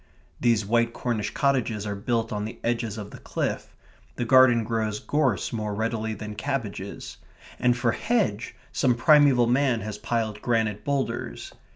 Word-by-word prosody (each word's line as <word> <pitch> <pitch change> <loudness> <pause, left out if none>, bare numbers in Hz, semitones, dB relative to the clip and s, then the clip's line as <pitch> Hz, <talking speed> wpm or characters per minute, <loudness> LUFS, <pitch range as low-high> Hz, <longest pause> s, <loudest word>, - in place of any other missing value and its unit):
These 115 -3 +2
white 115 +2 +2
Cornish 115 -4 -2
cottages 125 -7 0
are 105 -1 -3
built 115 +2 -1
on 105 0 -2
the 110 - -6
edge 120 0 0
of 105 -2 -6
the - - -10
cliff; - - -3 0.4
the 120 - -2
garden 125 -2 +6
grows 110 -2 -2
gorse 135 -10 0
more 105 -2 -3
readily 110 0 -2
than 105 0 -7
cabbages; 105 -5 -5 0.4
and 125 -1 +3
for 120 -1 +2
hedge, 190 - -1 0.2
some 125 -3 +2
primeval 140 -1 +5
man 125 -1 +2
has 105 0 -6
piled 110 -2 -2
granite 110 -3 0
boulders. 140 +1 -3
115 Hz, 155 wpm, -25 LUFS, 105-125 Hz, 0.4 s, garden